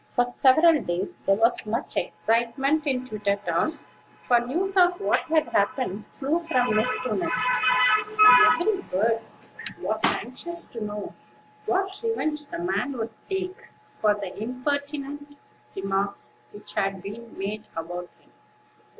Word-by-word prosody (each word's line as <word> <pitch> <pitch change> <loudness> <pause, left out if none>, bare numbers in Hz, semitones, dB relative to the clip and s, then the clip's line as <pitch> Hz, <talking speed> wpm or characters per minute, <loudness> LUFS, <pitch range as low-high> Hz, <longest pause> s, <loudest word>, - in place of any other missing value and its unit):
For 245 - +1
several 290 +6 +4
days, 175 +2 -3
there 195 - +5
was 230 +3 +2
much 230 +4 -2
excitement 270 +7 0
in 255 -2 0
Twittertown; 205 - -1 0.5
for 240 -1 +4
news 345 +11 -2
of 355 -1 +4
what 200 - +2
had 315 -1 +2
happened 205 0 -1
flew 295 +4 -1
from 255 -9 +1
nest 220 +4 +2
to 255 -4 -1
nest, 250 +5 +1 0.5
and 340 -7 +6
every 390 +1 +1
bird 225 +4 +1 0.6
was - - -2
anxious 340 +8 -2
to 230 -2 -6
know 210 0 -6 0.5
what 385 +1 -1
revenge 310 -10 -1
the 340 - -6
man 340 -6 -1
would 225 -3 -4 0.2
take 380 0 -4 0.2
for 210 -1 0
the 200 -3 -7
impertinent 285 +3 -4 0.4
remarks 195 +1 -3 0.2
which 205 - -10
had 195 -1 -1
been 225 +3 -9
made 210 +2 -5
about 175 +2 -5
him. - - -28
250 Hz, 135 wpm, -25 LUFS, 210-315 Hz, 0.6 s, and